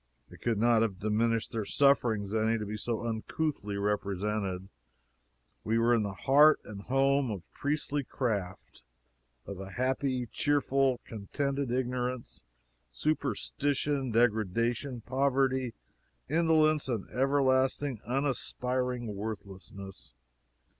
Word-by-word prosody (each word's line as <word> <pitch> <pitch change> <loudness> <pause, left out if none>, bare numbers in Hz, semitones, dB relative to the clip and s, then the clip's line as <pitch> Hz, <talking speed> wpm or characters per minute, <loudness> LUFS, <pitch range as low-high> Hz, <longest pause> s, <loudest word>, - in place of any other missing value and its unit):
It - - -14
could 115 -3 0
not 115 +1 +4
have 105 -5 0
diminished 110 +3 0
their 115 -3 -2
sufferings 115 -6 +2
any 110 +1 +2
to 105 - -4
be 105 +1 -4
so 115 +1 -3
uncouthly 110 -1 -2
represented. 100 -1 -1 1.0
We 110 +1 +1
were 115 +1 +4
in 115 - +3
the 100 -1 -2
heart 145 +8 +6
and 100 -1 -8
home 135 +2 +2
of 100 -5 -4
priest 145 0 -2 0.2
craft 100 - -3 0.6
of 100 -2 -7
a 95 0 -7
happy, 130 0 0
cheerful, 135 -3 +2
contented 140 +5 -3
ignorance, 125 0 -2 0.5
superstition, 140 - -1
degradation, 115 +3 +1
poverty, 130 -1 +1 0.5
indolence, 155 -2 +3
and 115 -6 -2
everlasting 135 -1 +1
unaspiring 125 -2 -1
worthlessness. 100 - -8
120 Hz, 105 wpm, -30 LUFS, 105-135 Hz, 1.0 s, heart